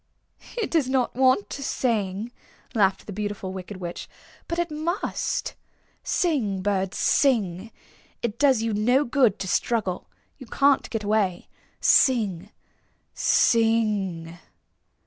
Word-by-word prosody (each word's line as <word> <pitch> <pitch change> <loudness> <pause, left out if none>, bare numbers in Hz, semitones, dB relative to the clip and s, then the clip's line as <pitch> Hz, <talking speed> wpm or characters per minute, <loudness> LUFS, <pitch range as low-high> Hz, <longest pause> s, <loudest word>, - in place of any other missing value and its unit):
"It 455 - -2
does 305 -6 +1
not 260 -2 0
want 260 +9 +3
to 280 - -5
sing," 220 -5 -1 0.4
laughed 195 -4 +1
the 205 - -7
Beautiful 205 -2 -4
Wicked 190 +1 -7
Witch; 175 -2 -7 0.4
"but 335 - -3
it 345 -2 -1
must. 320 +5 -2 0.5
Sing, 225 - 0
bird, 195 -1 -1
sing! 220 -7 +1 0.5
It 235 0 -3
does 265 -6 +3
you 225 -1 -1
no 245 +7 +3
good 240 -5 +2
to 190 - -5
struggle. 195 -1 -1 0.3
You 260 - -11
can't 280 +3 +2
get 225 -2 -3
away. 205 -4 0 0.3
Sing, 210 -8 +3 0.6
sing!" 205 -7 +1
220 Hz, 120 wpm, -25 LUFS, 195-260 Hz, 0.6 s, want